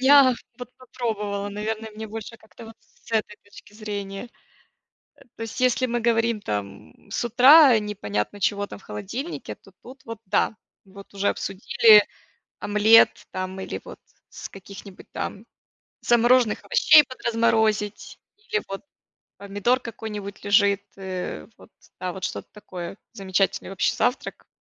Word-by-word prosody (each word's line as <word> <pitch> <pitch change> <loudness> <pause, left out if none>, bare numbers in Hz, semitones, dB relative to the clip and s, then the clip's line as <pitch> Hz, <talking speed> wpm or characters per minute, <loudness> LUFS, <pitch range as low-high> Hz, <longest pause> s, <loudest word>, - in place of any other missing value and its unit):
дня 265 -1 +6 0.2
вот 245 -1 -8
попробовала, 210 -5 -4
наверное, 220 +2 -4
мне 215 +1 -8
больше 225 +1 -8
как-то 220 +1 -15
вот 225 0 -12
с 225 - -19
этой 215 -2 -1
точки 205 0 -16
зрения. 205 0 -6 0.9
Э, - - -25
то - - -12
есть, 225 +2 -6
если 255 0 +2
мы 240 -1 -2
говорим 230 -1 +1
там 100 - -7
с - - -2
утра 255 +2 +7
непонятно 205 - -4
чего 205 +1 0
там - - -10
в - - -22
холодильнике, 230 - -6
то - - -21
тут 260 +1 -13
вот 230 -1 -7
да. 195 - +1 0.3
Вот 195 +1 -15
уже 200 0 0
обсудили 210 +2 +4 0.6
омлет 210 +2 +4
там 185 0 -5
или 190 - -5
вот - - -11 0.3
с - - -9
каких-нибудь 195 0 -12
там 205 +3 -5 0.6
замороженных 240 -1 +3
овощей 300 - +6
подразморозить, 225 -4 -1 0.2
или 430 0 -3
вот 195 0 -6 0.5
помидор 205 +6 0
какой-нибудь 210 -4 -8
лежит, 200 -1 +3
э, 185 - -6
вот - - -17 0.3
там 180 -1 -4
вот 190 - -9
что-то - - -5
такое, 185 -4 -8 0.2
замечательный 195 0 -1
вообще 195 - 0
завтрак, 250 +1 -2
210 Hz, 140 wpm, -24 LUFS, 195-235 Hz, 0.9 s, утра